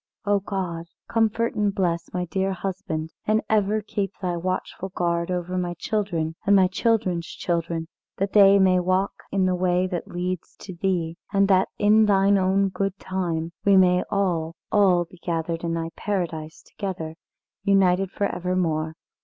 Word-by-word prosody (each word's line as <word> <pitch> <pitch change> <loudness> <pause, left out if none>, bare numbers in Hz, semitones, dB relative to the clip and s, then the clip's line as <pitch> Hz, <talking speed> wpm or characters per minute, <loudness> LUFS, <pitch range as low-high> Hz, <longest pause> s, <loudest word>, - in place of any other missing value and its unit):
"O 205 0 +3
God, 180 -4 -4 0.2
comfort 225 0 +1
and 205 -2 0
bless 170 -3 -1
my 180 0 -2
dear 190 +2 -1
husband, 180 -4 -4 0.2
and 215 +1 +2
ever 215 0 +2
keep 200 -2 -2
Thy 180 -2 -2
watchful 185 +2 -3
guard 170 -1 -1
over 180 0 -2
my 175 -1 -2
children 175 -5 -2
and 200 -1 +4
my 190 -1 +6
children's 185 -4 0
children, 170 -1 -2 0.3
that 195 +1 -1
they 200 -1 +7
may 185 -2 +4
walk 185 +2 +1 0.2
in 190 -1 +2
the 185 - +2
way 180 0 +1
that 180 -2 -4
leads 180 0 -4
to 190 - -8
Thee, 170 -2 -1
and 195 0 +3
that 190 -1 +4
in 215 +1 +5
Thine 200 0 +4
own 195 +1 +2
good 195 0 -2
time 170 -4 -3
we 200 -1 +5
may 180 -1 +4
all 175 -5 0 0.2
all 185 -4 +4
be 170 +1 -18
gathered 165 -1 -2
in 165 0 -1
Thy 165 0 -3
Paradise 165 -6 -3
together, 185 -6 -5 0.5
united 195 -2 +3
for 200 - -2
evermore. 170 -4 -1
185 Hz, 160 wpm, -24 LUFS, 170-195 Hz, 0.5 s, they